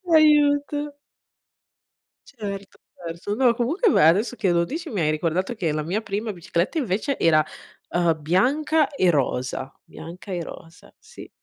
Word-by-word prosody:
Aiuto! 290 -1 +3 1.3
Certo, 200 -5 -7 0.2
perso. 170 +4 -5
No, 245 -1 +4
comunque 315 - +1
beh, - - +4
adesso 210 +9 +2
che 190 -4 +1
lo 170 0 +2
dici, 320 - -5
mi 200 -6 -2
hai 155 0 +2
ricordato 170 +7 -1
che 170 -7 -1
la 155 0 -2
mia 190 +8 -2
prima 210 +1 -3
bicicletta 175 - -2
invece 245 - -1
era, 155 -2 +4 0.4
uhm, 170 -2 +1
bianca 280 - +2
e 185 -11 +1
rosa. 130 -2 -1
Bianca 175 +4 -10
e 175 -2 -2
rosa, 165 +1 -12
sì. 455 +2 -13
200 Hz, 145 wpm, -23 LUFS, 170-280 Hz, 1.3 s, No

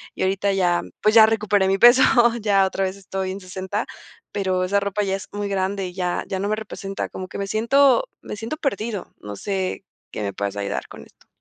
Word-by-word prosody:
y - - -2
ahorita 195 +1 +1
ya, 175 -2 +2 0.2
pues, 215 - +3
ya 220 - +10
recuperé 210 -3 +2
mi 195 - +2
peso, 240 +5 +7 0.4
ya 200 -2 +3
otra 195 0 -2
vez 190 +1 -3
estoy 190 -1 -4
en 195 - -6
60, 190 +3 -4 0.5
pero 185 -2 0
esa 200 +2 +2
ropa 200 +1 -1
ya 195 -1 0
es 195 - -7
muy 205 0 -3
grande, 195 0 -1
y 180 - -9
ya 180 -1 -2
ya 190 - -3
no 200 - -1
me 215 - +1
representa. 200 -2 -5
Como 185 - -7
que - - -8
me 200 - -2
siento 270 - +3 0.2
me - - -7
siento 225 +9 -5
perdido, 220 -7 -3
no 105 0 -8
sé 190 - -3 0.3
qué 105 - -4
me 100 - -3
puedas 100 +1 -3
ayudar 100 -1 -3
con - - -11
esto. - - -23
195 Hz, 220 wpm, -22 LUFS, 185-210 Hz, 0.5 s, ya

